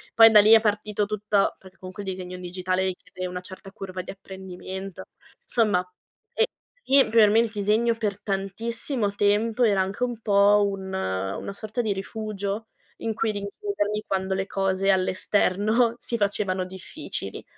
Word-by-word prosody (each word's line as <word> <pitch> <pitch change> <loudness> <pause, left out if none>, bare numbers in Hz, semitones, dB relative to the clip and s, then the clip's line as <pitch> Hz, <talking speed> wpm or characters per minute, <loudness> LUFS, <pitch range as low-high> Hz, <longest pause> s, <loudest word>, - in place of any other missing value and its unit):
poi 225 0 +9
da 215 - +8
lì 215 +2 +7
è 225 - +8
partito 210 -1 0
tutto, 210 -1 +1
perché 190 0 -16
comunque 185 +2 -8
il 195 - -4
disegno 185 -1 -5
in 180 - -9
digitale 185 +1 -1
richiede 185 0 -5
una 180 0 -5
certa 190 +1 -11
curva 190 -2 -6
di 180 - -8
apprendimento. 190 0 -8 0.4
Insomma, 220 - +2 0.5
ehm, 455 - +3
e - - -16 0.4
sì 275 0 +5
per 220 -2 +6
me 220 +2 +4
il 230 0 +2
disegno 215 +3 +1
per 210 -3 -2
tantissimo 210 +3 -2
tempo 215 +4 +2
era 205 -4 +4
anche 195 +5 -2
un 240 -2 -2
po' 205 -1 +4
un 195 -1 -5
una 95 - -3
sorta 215 +4 -3
di 215 -3 0
rifugio 205 +1 -4 0.3
in 225 - -2
cui 225 0 0
rinchiudermi 210 - -3
quando 190 0 -1
le 190 0 -2
cose 195 0 +1
all' 185 -1 +2
esterno 215 +5 +2
si 235 - -2
facevano 200 -3 0
difficili. 185 -1 -7
200 Hz, 165 wpm, -25 LUFS, 190-220 Hz, 0.5 s, poi